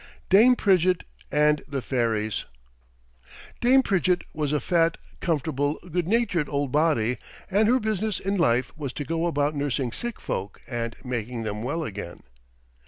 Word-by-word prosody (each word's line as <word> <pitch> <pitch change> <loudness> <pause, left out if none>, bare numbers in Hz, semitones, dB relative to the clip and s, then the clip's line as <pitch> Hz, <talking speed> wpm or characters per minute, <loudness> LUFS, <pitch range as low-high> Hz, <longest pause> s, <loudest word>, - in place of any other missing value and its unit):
DAME 230 +6 +7
PRIDGETT 185 -4 +3 0.3
AND 150 0 +3
THE 140 -3 -3
FAIRIES 110 -4 -1 1.1
Dame 260 +2 +5
Pridgett 185 -4 +1
was 150 -2 -1
a 150 - +2
fat, 165 0 +2 0.2
comfortable, 150 -3 0 0.2
good 175 0 0
natured 190 -8 +1
old 140 -2 -1
body, 145 -6 +2 0.3
and 210 +3 +4
her 250 +3 +4
business 215 -2 -1
in 195 +1 -1
life 125 -8 +1
was 140 -4 -5
to 145 - -4
go 165 +2 0
about 145 -2 +1
nursing 140 -3 -1
sick 240 - -5
folk 100 +2 -4
and 115 -2 -3
making 120 -2 -3
them 105 -1 -3
well 160 +8 -2
again. 100 - -7
150 Hz, 150 wpm, -25 LUFS, 125-185 Hz, 1.1 s, DAME